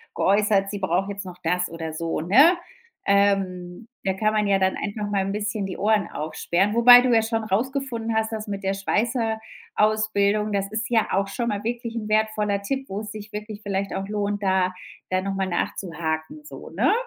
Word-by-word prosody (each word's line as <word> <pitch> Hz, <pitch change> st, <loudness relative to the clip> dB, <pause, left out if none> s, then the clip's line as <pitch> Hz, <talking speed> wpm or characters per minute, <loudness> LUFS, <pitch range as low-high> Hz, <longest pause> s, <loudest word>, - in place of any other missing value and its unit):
geäußert, 200 Hz, 0 st, +2 dB
sie 205 Hz, 0 st, -4 dB
braucht 190 Hz, +1 st, 0 dB
jetzt 200 Hz, 0 st, -5 dB
noch 180 Hz, -1 st, -9 dB
das 180 Hz, +2 st, 0 dB
oder 165 Hz, -1 st, -5 dB
so, 165 Hz, 0 st, -3 dB
ne? 275 Hz, -, +6 dB, 0.5 s
Ähm, 195 Hz, -1 st, +1 dB, 0.2 s
da 190 Hz, -, +1 dB
kann 215 Hz, +3 st, 0 dB
man 215 Hz, -1 st, +2 dB
ja 195 Hz, -1 st, +3 dB
dann 190 Hz, 0 st, +2 dB
einfach 210 Hz, 0 st, -4 dB
mal 200 Hz, -1 st, +1 dB
'n 195 Hz, -, -2 dB
bisschen 210 Hz, 0 st, -2 dB
die 190 Hz, -, -5 dB
Ohren 210 Hz, 0 st, +2 dB
aufsperren, 175 Hz, +6 st, -1 dB
wobei 245 Hz, +1 st, +9 dB
du 255 Hz, 0 st, +1 dB
ja 225 Hz, -, +5 dB
schon 225 Hz, 0 st, -1 dB
rausgefunden 230 Hz, +1 st, -2 dB
hast, 220 Hz, 0 st, 0 dB
dass 215 Hz, 0 st, -5 dB
mit 200 Hz, -1 st, -5 dB
der 195 Hz, 0 st, 0 dB
Schweißerausbildung, 215 Hz, -1 st, 0 dB
das 200 Hz, 0 st, -1 dB
ist 220 Hz, +1 st, -3 dB
ja 225 Hz, -2 st, +2 dB
auch 195 Hz, +1 st, +1 dB
schon 235 Hz, +4 st, -3 dB
mal 205 Hz, -1 st, -3 dB
wirklich 235 Hz, 0 st, -4 dB
'n 220 Hz, -2 st, -4 dB
wertvoller 215 Hz, -2 st, +1 dB
Tipp, 265 Hz, +6 st, -3 dB
wo 195 Hz, -, -3 dB
es 210 Hz, -1 st, -7 dB
sich 215 Hz, 0 st, -9 dB
wirklich 210 Hz, 0 st, -6 dB
vielleicht 195 Hz, -1 st, -2 dB
auch 195 Hz, -, -3 dB
lohnt, 205 Hz, 0 st, -2 dB
da 190 Hz, -1 st, +2 dB, 0.4 s
da 185 Hz, 0 st, +1 dB
noch 195 Hz, +1 st, -3 dB
mal 195 Hz, 0 st, -1 dB
nachzuhaken, 170 Hz, -, -3 dB
so, -, -, -10 dB
ne? -, -, +2 dB
205 Hz, 195 wpm, -24 LUFS, 195-220 Hz, 0.5 s, wobei